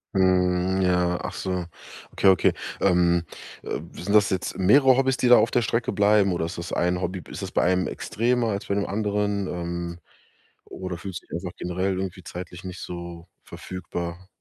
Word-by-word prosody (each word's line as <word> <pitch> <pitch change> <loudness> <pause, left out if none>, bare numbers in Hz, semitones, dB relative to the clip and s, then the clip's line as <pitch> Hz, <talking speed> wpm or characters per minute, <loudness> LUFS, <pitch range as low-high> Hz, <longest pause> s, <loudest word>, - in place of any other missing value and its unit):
Mhm, 95 0 +2
ja. 90 -1 +2
Ach - - -4
so. 90 -2 -3 0.5
Okay, - - +1
okay. 95 -2 +5 0.3
Ähm, 85 -2 +3 0.4
äh, - - -3
sind 100 +4 -4
das 105 -1 +5
jetzt 95 -1 -2
mehrere 130 +8 +6
Hobbys, 130 0 +2
die 125 - +1
da 120 - +8
auf - - +3
der 120 - +2
Strecke 115 +2 0
bleiben, 100 -1 +4
oder 85 -2 -1
ist 85 +1 -6
das 85 - -6
ein 90 +1 0
Hobby? 90 +1 -3
B - - -15
ist - - -6
das - - -5
bei - - +2
einem 90 +1 +2
extremer 120 +1 0
als 105 +3 -3
bei 100 - 0
den 100 - 0
anderen, 105 -1 -1
ähm, 85 0 -4 0.6
oder 90 -2 -6
fühlst 90 -1 -7
du - - -26
dich - - -13
einfach 85 +1 -6
generell 90 +2 -1
irgendwie 95 -1 -5
zeitlich 90 0 -8
nicht 90 -1 -7
so 85 -1 -7 0.2
verfügbar? 90 0 -6
95 Hz, 190 wpm, -25 LUFS, 90-100 Hz, 0.6 s, da